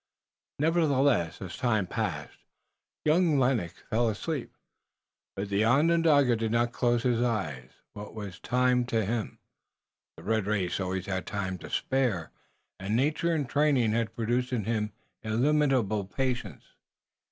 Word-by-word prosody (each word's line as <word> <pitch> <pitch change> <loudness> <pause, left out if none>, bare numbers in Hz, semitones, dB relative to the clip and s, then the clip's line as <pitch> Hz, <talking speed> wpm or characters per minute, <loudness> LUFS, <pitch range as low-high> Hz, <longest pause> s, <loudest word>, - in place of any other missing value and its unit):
Nevertheless, 140 - +2
as 95 - -7
time 110 -6 +1
passed, - - -4 0.7
young 160 0 +3
Lennox 125 -10 0
fell 115 +1 +2
asleep, 135 +6 -4 0.8
but 100 +1 -4
the 100 +2 +2
Onondaga 145 0 +4
did 110 -1 -2
not 120 +1 +1
close 120 -1 +1
his 120 -2 +1
eyes. 80 - -2 0.2
What 105 +1 -9
was 100 -4 -7
time 125 0 +2
to 115 -4 0
him? 110 +1 -3 0.8
The - - -12
red 110 -2 0
race 95 -4 0
always 95 0 -2
had 95 -3 -3
time 95 -3 -3
to - - -9
spare, 120 -11 0 0.5
and 95 +3 -2
nature 150 +6 +1
and 145 -4 -1
training 140 -5 +2
had 115 0 -1
produced 120 +3 -1
in 120 -4 -1
him 105 0 -1 0.3
illimitable 120 -3 +1
patience. 125 +4 -3
115 Hz, 135 wpm, -28 LUFS, 105-135 Hz, 0.8 s, Onondaga